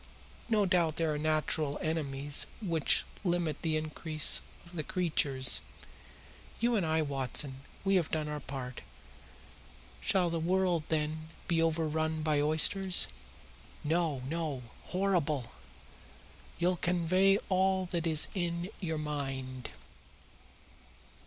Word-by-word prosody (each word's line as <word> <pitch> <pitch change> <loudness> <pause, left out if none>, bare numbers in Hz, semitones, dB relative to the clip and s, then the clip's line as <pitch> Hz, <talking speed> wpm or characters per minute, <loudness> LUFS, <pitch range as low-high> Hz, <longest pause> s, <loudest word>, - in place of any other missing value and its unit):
No 215 -3 +3
doubt 175 -4 +2
there 160 -2 0
are 150 - -3
natural 155 -1 +1
enemies 145 -3 -1
which 170 -8 +2 0.2
limit 170 -5 -1
the 160 -2 +1
increase 155 0 0 0.2
of 170 +1 -14
the 160 - -1
creatures. 150 -7 +4 1.0
You 235 +1 +2
and 200 - +2
I, 160 0 +1
Watson, 135 -1 -1 0.2
we 195 0 +3
have 170 - 0
done 155 -1 -2
our 150 0 -4
part. 130 -3 -6 1.2
Shall 185 -4 +2
the 165 - -1
world, 175 -1 +1
then, 155 0 -1 0.2
be 165 -2 +2
overrun 160 -1 0
by 150 -2 +2
oysters? 175 +5 +3 0.7
No, 155 -4 0
no; 155 -4 -3 0.2
horrible! 170 -9 0 1.1
You'll 180 +1 +1
convey 180 +3 +3
all 190 -1 +2
that 170 -2 -1
is 155 -1 +3
in 175 0 -2
your 160 -4 -2
mind." 135 - -4
160 Hz, 115 wpm, -31 LUFS, 150-175 Hz, 1.2 s, creatures